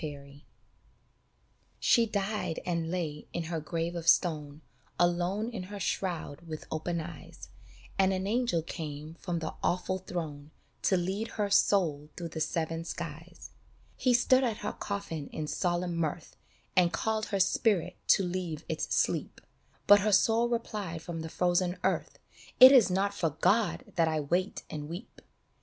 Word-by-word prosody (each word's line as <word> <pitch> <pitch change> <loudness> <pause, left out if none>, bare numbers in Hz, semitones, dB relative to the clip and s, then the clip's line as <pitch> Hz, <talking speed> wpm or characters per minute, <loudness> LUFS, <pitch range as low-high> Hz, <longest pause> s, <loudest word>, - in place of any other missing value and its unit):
BALLAD 140 -1 -8 1.4
SHE 235 -2 +4
died 200 -4 -2
and 170 -2 -1
lay 160 -4 -3
in 170 - -2
her 165 0 -3
grave 165 +2 -3
of 170 -1 -5
stone, 150 -4 +2 0.4
Alone 175 +5 +1
in 220 -5 -5
her 205 -1 -6
shroud 175 -7 -2
with 155 -1 -6
open 170 +2 -2
eyes, 160 -1 -9 0.5
And 190 0 +4
an 190 0 -1
angel 225 -6 +1
came 155 -2 -6
from 175 -3 -3
the 160 -1 -4
awful 185 +1 0
throne 155 -6 -5 0.4
To 190 - +4
lead 190 +5 -2
her 205 -2 0
soul 155 -8 +3
through 170 -1 -4
the 160 -1 -5
seven 165 0 -1
skies. 165 +1 -7 0.4
He 250 -2 +3
stood 255 +2 +4
at 225 -4 -2
her - - -2
coffin 185 -8 -4
in 155 - -4
solemn 175 +2 -1
mirth 165 0 -3 0.4
And 175 -2 +4
called 220 +5 -1
her 200 - -1
spirit 185 -2 +2
to 195 - +5
leave 175 -3 -3
its 160 - -2
sleep, - - 0 0.5
But 205 0 +8
her 210 +2 +1
soul 225 +4 +4
replied 205 -8 -3
from 170 -2 -5
the 160 - -5
frozen 180 +1 +1
earth, - - -1 0.2
" - - -21
It 255 +1 +12
is 255 -8 +7
not 195 +2 +1
for 170 -5 0
God 190 +6 +1
that 165 -1 +4
I 155 -1 0
wait 175 +7 -1
and 150 -1 -6
weep 175 +4 -9
175 Hz, 160 wpm, -30 LUFS, 160-200 Hz, 1.4 s, It